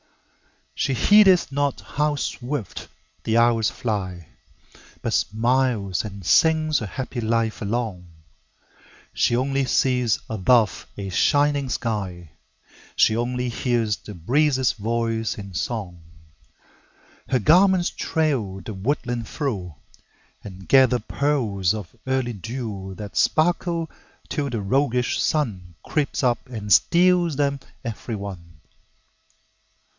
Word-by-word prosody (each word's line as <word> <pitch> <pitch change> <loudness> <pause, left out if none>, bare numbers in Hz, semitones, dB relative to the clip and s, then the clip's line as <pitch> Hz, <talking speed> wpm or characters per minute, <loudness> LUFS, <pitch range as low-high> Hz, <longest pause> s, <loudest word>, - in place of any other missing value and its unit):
She 135 - -1
heedeth 190 - +5
not 140 0 0
how 150 0 -1
swift 130 -4 -4 0.4
the 110 +1 +1
hours 115 -2 +3
fly, 95 -7 -4 0.7
But - - -1
smiles 115 -3 +1
and 100 -4 -8
sings 155 - +3
her 110 - -5
happy 130 +2 -5
life 115 0 0
along; 105 -4 -3 1.1
She 120 - +2
only 135 +1 0
sees 125 -3 +1
above 110 +2 +2
a 100 -1 -5
shining 145 - +2
sky; 95 -9 -3 0.6
She 110 - +4
only 125 +2 -1
hears 115 -3 0
the 105 - -11
breezes' 130 - +2
voice 115 +1 -2
in 100 -2 -8
song. 90 -3 -4 1.3
Her 130 - +3
garments 180 - +4
trail 130 -12 -1
the 110 - -7
woodland 120 +2 -2
through, 100 - -4 0.7
And 95 -1 -10
gather 130 -2 +5
pearls 110 -7 0
of 100 -6 -8
early 130 -2 0
dew 105 -3 -6
That 105 -1 -8
sparkle 170 0 +1 0.4
till 145 -2 -2
the 115 -4 -3
roguish 125 +3 +1
Sun 95 - -1
Creeps 145 -2 -1
up 120 0 +1
and 105 -4 0
steals 175 -2 +4
them 140 0 0 0.2
every 115 0 -5
one. 100 -4 -7
120 Hz, 110 wpm, -23 LUFS, 105-140 Hz, 1.3 s, heedeth